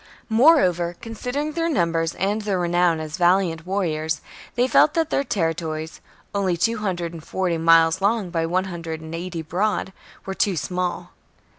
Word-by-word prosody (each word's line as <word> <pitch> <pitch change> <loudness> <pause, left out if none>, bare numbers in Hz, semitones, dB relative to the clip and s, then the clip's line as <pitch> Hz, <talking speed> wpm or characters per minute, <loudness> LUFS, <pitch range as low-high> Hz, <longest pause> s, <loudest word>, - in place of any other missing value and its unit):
Moreover, 185 - +4
considering 250 +7 -4
their 330 +1 -1
numbers 165 - 0
and 205 +3 -1
their 205 -3 -1
renown 175 -1 +2
as 155 0 -5
valiant 175 -2 +2
warriors, 160 -5 -1 0.4
they 245 +1 +2
felt 300 +3 +4
that 325 -2 0
their 275 - +1
territories 165 - -3 0.2
— - - -33
only 190 -4 0
two 230 +7 +1
hundred 175 -5 -2
and 165 -2 -9
forty 175 -2 -1
miles 165 +1 +5
long 200 -2 +1
by 165 -2 0
one 185 +3 +1
hundred 165 -3 -5
and 160 0 -8
eighty 170 -1 -4
broad 190 +4 -1 0.2
— - - -23
were 195 - -3
too 190 -2 0
small. 180 +3 -3
180 Hz, 170 wpm, -23 LUFS, 165-205 Hz, 0.4 s, miles